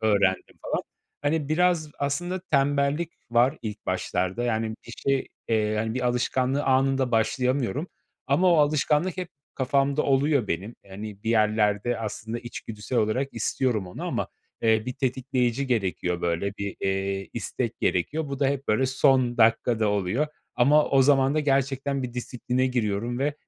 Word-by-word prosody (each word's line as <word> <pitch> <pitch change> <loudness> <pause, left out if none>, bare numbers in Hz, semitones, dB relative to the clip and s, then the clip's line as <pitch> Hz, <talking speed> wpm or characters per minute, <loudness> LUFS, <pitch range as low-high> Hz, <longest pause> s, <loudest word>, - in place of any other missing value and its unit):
öğrendim, 100 -4 +1
falan. - - -2 0.4
Hani, 145 0 0
biraz 165 -1 +2
aslında 175 +6 -2
tembellik 145 +3 +1 0.2
var 125 +5 +3
ilk 105 -1 -6
başlarda. 95 +3 -1
Yani, 110 -2 -1
bir 115 - -9
şey, 135 -1 0 0.2
eee, 110 -1 +1
hani, 110 +1 -1
bir 130 - -1
alışkanlığı 130 +3 +1
anında 135 -1 +2
başlayamıyorum. 130 +6 0 0.4
Ama 175 +6 +4
o - - +5
alışkanlık 150 +4 +2
hep 180 -2 -4 0.3
kafamda 140 +2 +1
oluyor 140 -3 +2
benim. 100 +8 -3
Hani, 100 +1 -8
bir 115 - -1
yerlerde 110 +1 +2
aslında 110 +1 -4
içgüdüsel 115 0 -5
olarak 125 +6 0
istiyorum 115 -3 0
onu 90 - -7
ama, - - -2 0.3
eee, 110 -1 +3
bir 125 - -2
tetikleyici 130 0 0
gerekiyor, 95 -7 -1
böyle, 85 +4 -1
bir, 100 -1 -4
eee, 95 0 -1
istek - - -3
gerekiyor. 150 - 0
Bu 140 0 -5
da 140 - +4
hep, 140 0 -2
böyle, 130 +5 +3
son 130 -2 +3
dakikada 115 -1 +3
oluyor 105 +8 0 0.3
ama 145 +5 +5
o 135 -1 +5
zaman 135 0 +4
da 155 - +2
gerçekten 140 -1 0
bir 125 -1 -5
disipline 125 +1 -1
giriyorum 120 -1 -1
ve, 145 +2 0
125 Hz, 150 wpm, -26 LUFS, 110-140 Hz, 0.4 s, o